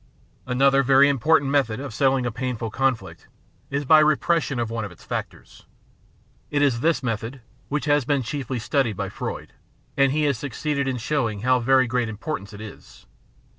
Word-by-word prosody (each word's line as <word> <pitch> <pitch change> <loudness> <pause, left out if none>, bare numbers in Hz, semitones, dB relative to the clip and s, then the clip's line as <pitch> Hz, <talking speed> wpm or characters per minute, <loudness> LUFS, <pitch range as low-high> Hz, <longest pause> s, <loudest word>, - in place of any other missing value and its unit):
Another 135 +2 +3
very 135 +1 +5
important 140 +1 +2
method 130 -5 +1
of 140 -3 -6
settling 135 0 +2
a 120 - -1
painful 120 -2 -4
con 135 +1 +2
flict 95 -6 -13 0.4
is 140 +1 -2
by 155 +3 +7
repression 155 -1 +2
of 115 -1 -2
one 115 -1 -3
of 100 - -6
its 90 - -16
factors. - - -7 0.8
It 145 -1 +1
is 130 -5 +2
this 155 -1 +1
method 115 +2 -4 0.3
which 150 0 -2
has 145 -1 +3
been 140 0 0
chiefly 130 0 -4
studied 115 -2 0
by - - -3
Freud, - - -6 0.4
and 135 -1 +3
he 155 +2 0
has 140 -6 +1
succeeded 140 +1 -2
in 130 -1 -1
show 125 +1 0
ing 105 -2 -7
how 130 +2 +3
very 130 +2 +4
great 125 -1 -1
its 110 - -6
importance 105 -3 -5
is. 105 0 -12
130 Hz, 185 wpm, -23 LUFS, 115-140 Hz, 0.8 s, by